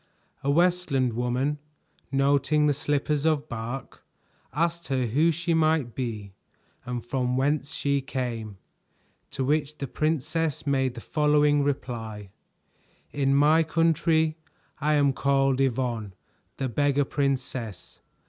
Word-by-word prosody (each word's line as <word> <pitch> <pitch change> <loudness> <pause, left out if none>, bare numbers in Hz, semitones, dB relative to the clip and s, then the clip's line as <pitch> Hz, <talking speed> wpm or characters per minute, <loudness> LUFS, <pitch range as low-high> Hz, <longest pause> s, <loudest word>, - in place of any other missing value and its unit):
A 140 - 0
Westland 160 -6 +2
woman, 125 +5 -1 0.5
noting 140 +2 +2
the 145 - +3
slippers 145 0 -1
of 155 -2 +1
bark, 120 +2 -6 0.5
asked 170 +2 -1
her 130 -2 0
who 150 +9 +3
she 170 +1 -1
might 155 -6 +2
be 110 -6 -5 0.5
and 120 -1 -4
from 125 0 -1
whence 140 +1 0
she 140 -1 0
came; 120 -6 -4 0.7
to 130 - -3
which 150 +1 0
the 140 - -3
princess 155 +2 -1
made 135 -3 +1
the 115 - -7
following 150 0 +3
reply: 115 -7 -4 0.8
"In 135 -1 +1
my 150 +3 +5
country 160 0 +2 0.4
I 150 +1 +2
am 140 -2 +3
called 135 -1 +2
Yvonne, 120 -6 -1 0.4
the 135 - -1
Beggar 145 +3 +1
Princess. 130 -8 -3
140 Hz, 120 wpm, -26 LUFS, 125-150 Hz, 0.8 s, my